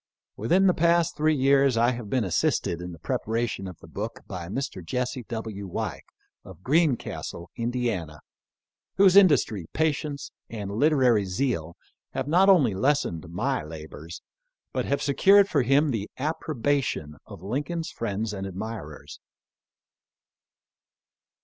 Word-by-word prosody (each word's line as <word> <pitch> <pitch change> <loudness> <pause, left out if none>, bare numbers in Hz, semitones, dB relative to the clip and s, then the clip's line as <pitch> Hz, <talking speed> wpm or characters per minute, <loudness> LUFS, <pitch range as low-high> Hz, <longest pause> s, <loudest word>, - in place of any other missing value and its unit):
Within 175 - +2
the 185 - +5
past 170 0 +2
three 155 +1 +2
years 135 -2 +3
I 120 +2 +4
have 120 -4 -6
been 125 +1 +1
assisted 85 -2 0
in 90 0 -6
the 85 - -10
preparation 110 +2 -2
of 90 -3 -9
the - - -13
book - - -6
by 85 -2 -6
Mr. 100 -3 -4
Jesse 125 +9 -2
W. 110 -4 -5
Weik, - - -4 0.4
of 95 -1 -13
Greencastle, 140 - 0
Ind., 115 -8 -2 0.9
whose 195 -1 +6
industry, 145 - +4
patience, 150 -2 -1 0.2
and 105 -3 -5
literary 125 -3 +3
zeal 90 - -2 0.4
have 135 0 -2
not 180 +6 +4
only 145 - +5
lessened 95 - 0
my 130 +10 -1
labors, 80 +1 -9 0.5
but - - -1
have 140 - -1
secured 195 +8 +5
for 150 -8 +2
him 140 +4 +3
the 105 -4 -3
approbation 140 - -1
of 85 - -11
Lincoln's 155 - -3
friends 110 -1 -3
and 95 -1 -4
admirers. 95 - -7
120 Hz, 130 wpm, -26 LUFS, 95-145 Hz, 0.9 s, whose